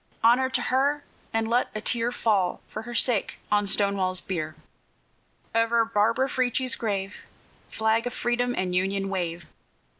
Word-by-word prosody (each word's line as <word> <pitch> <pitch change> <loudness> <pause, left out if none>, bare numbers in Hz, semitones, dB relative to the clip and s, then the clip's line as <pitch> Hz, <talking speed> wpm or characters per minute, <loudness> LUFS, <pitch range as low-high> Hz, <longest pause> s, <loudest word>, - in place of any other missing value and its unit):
Honor 250 +3 +5
to 255 -1 0
her! 280 +4 +1 0.3
and 225 0 0
let 240 +2 +2
a - - -1
tear 235 +1 0
Fall, 205 -7 +1
for - - -6
her 240 +1 -8
sake, 235 -4 +1
on 205 -1 +2
Stonewall's 195 -2 +2
bier. 155 -5 -4 1.0
Over 230 0 +3
Barbara 230 +4 +2
Frietchie's 255 -1 0
grave, 200 -3 -3 0.5
Flag 220 +2 +1
of 245 - -4
Freedom 245 +1 0
and 185 -1 -1
Union, 195 +2 0
wave! 175 -3 -3
225 Hz, 145 wpm, -26 LUFS, 195-245 Hz, 1.0 s, Honor